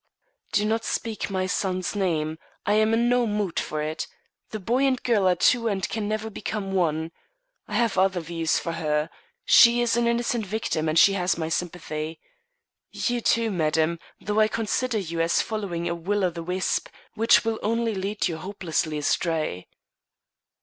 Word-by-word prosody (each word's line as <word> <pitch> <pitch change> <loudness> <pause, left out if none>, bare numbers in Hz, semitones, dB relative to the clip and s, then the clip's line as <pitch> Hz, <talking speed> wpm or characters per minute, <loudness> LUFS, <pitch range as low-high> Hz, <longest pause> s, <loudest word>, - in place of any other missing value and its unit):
"Do 210 0 +2
not 225 +1 0
speak 225 -3 -3
my 190 -1 -1
son's 185 0 -1
name. 160 -5 -1 0.3
I 205 - +2
am 215 +1 +3
in 230 +1 +2
no 245 -1 +3
mood 205 -4 -1
for 155 0 -3
it. 155 +1 -3 0.4
The 215 - -5
boy 235 +7 0
and 260 -1 +2
girl 215 -6 +3
are 180 - +4
two 230 +6 +3
and 190 -3 -1
can 215 -1 -3
never 215 +1 -3
become 200 -1 -4
one. 160 -3 0 0.6
I 210 - -5
have 225 -4 +2
other 190 -1 +2
views 165 -1 -1
for 170 - -3
her 155 -1 -1 0.3
she 235 0 +7
is 240 -1 +2
an 240 0 +2
innocent 235 -1 0
victim 180 -6 -1
and 155 - 0
she 195 - +7
has 180 -3 0
my 160 -1 -2
sympathy. 160 -2 -4 0.7
You, 245 -1 -1
too, 230 -1 +2
madam, 160 -1 +1 0.2
though 210 +2 -1
I 215 - +5
consider 225 +2 -1
you 170 -4 -2
as 165 0 +2
following 195 -6 -2
a 170 - 0
will 195 +4 -1
o' 180 - +1
the 170 0 -6
wisp 180 +2 -1 0.2
which 225 +1 +4
will 225 -1 -1
only 230 +1 0
lead 200 +2 -1
you 165 - -3
hopelessly 165 -4 -2
astray." 155 - -1
195 Hz, 175 wpm, -25 LUFS, 165-220 Hz, 0.7 s, she